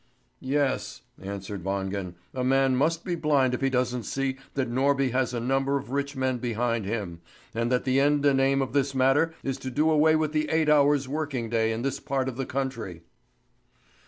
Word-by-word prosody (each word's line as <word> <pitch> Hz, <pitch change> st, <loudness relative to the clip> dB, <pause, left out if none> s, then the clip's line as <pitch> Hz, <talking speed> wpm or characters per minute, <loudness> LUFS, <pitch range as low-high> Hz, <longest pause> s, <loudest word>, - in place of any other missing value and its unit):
"Yes," 135 Hz, 0 st, -1 dB, 0.2 s
answered 100 Hz, -1 st, -6 dB
Wangen; 95 Hz, -1 st, -3 dB, 0.2 s
"a 130 Hz, -, -2 dB
man 135 Hz, 0 st, +3 dB
must 160 Hz, +5 st, +1 dB
be 180 Hz, -, -1 dB
blind 145 Hz, -6 st, +2 dB
if 125 Hz, -, -2 dB
he 135 Hz, -, +2 dB
doesn't 125 Hz, -1 st, 0 dB
see 135 Hz, +2 st, -2 dB, 0.2 s
that 135 Hz, -2 st, 0 dB
Norby 135 Hz, +2 st, +1 dB
has 130 Hz, 0 st, 0 dB
a 120 Hz, -, -2 dB
number 135 Hz, +3 st, +1 dB
of 135 Hz, -2 st, -7 dB
rich 140 Hz, +1 st, -2 dB
men 130 Hz, -1 st, -1 dB
behind 115 Hz, -2 st, -1 dB
him, 100 Hz, -6 st, -4 dB, 0.3 s
and 115 Hz, +2 st, -1 dB
that 125 Hz, -, +2 dB
the 130 Hz, +1 st, +2 dB
end 145 Hz, +1 st, +2 dB
and 135 Hz, -2 st, +4 dB
aim 135 Hz, 0 st, +3 dB
of 130 Hz, -, -6 dB
this 140 Hz, -1 st, +1 dB
matter 135 Hz, +5 st, +3 dB
is 135 Hz, 0 st, -3 dB
to 130 Hz, -, -5 dB
do 150 Hz, +5 st, +2 dB
away 155 Hz, +1 st, +4 dB
with 155 Hz, -1 st, 0 dB
the 155 Hz, -1 st, 0 dB
eight 160 Hz, -1 st, +2 dB
hours' 145 Hz, -2 st, +4 dB
working 135 Hz, -5 st, -3 dB
day 115 Hz, -1 st, +2 dB
in 115 Hz, +1 st, -3 dB
this 135 Hz, 0 st, -2 dB
part 135 Hz, -1 st, -2 dB
of 130 Hz, -, -4 dB
the 135 Hz, 0 st, -3 dB
country." 115 Hz, -11 st, -4 dB
135 Hz, 200 wpm, -26 LUFS, 120-140 Hz, 0.3 s, and